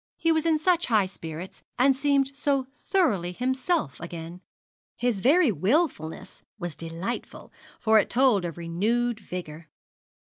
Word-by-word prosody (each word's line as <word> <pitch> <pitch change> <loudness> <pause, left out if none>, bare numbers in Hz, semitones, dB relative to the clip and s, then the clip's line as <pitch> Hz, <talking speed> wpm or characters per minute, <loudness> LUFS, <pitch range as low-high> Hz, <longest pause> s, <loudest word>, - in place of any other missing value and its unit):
He 330 - +2
was 320 0 +1
in 320 -1 +4
such 345 +2 +2
high 215 -4 +3
spirits, 170 -1 -8 0.2
and 265 +2 +4
seemed 275 0 +1
so 275 -2 0
thoroughly 210 - 0
himself 260 - -1
again. 170 +1 -8 0.6
His 240 -5 0
very 300 - +5
wilfulness 190 - -1 0.2
was 175 -4 -5
delightful, 170 +8 -6 0.3
for 220 -1 +5
it - - 0
told 245 -6 +3
of 170 -2 -5
renewed 215 +8 0
vigour. 170 -5 -8
225 Hz, 135 wpm, -26 LUFS, 175-275 Hz, 0.6 s, very